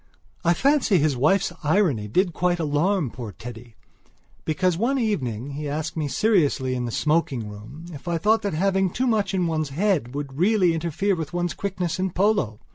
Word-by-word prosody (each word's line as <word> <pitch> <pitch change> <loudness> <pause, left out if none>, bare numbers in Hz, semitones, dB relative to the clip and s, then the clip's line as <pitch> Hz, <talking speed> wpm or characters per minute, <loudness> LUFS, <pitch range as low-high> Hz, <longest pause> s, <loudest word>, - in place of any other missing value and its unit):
I 170 0 +3
fancy 275 - +3
his 150 -3 +2
wife's 165 +10 +2
irony 150 - +2
did 175 - +1
quite 175 +1 +1
alarm 155 - +1
poor 115 -4 -7
Teddy; 115 +1 -10 0.7
because 165 +3 +1
one 240 +9 +1
evening 140 - -2
he 145 +1 -4
asked 155 +2 -3
me 155 -2 -1
seriously 145 - +2
in 125 -1 -2
the 120 - -4
smoking 150 -5 0
room 105 +10 -10
if 145 +4 -11
I 170 -1 0
thought 215 +6 +2
that 200 -6 -2
having 190 +2 +2
too 255 +9 -1
much 210 -5 +1
in 180 -2 +1
one's 155 -3 -1
head 150 - 0
would 140 -1 -5
really 185 -2 +3
interfere 170 +5 0
with 160 -1 -5
one's 175 -1 -1
quickness 185 -3 -3
in 190 +1 0
polo. 185 - +1
165 Hz, 185 wpm, -24 LUFS, 140-195 Hz, 0.7 s, I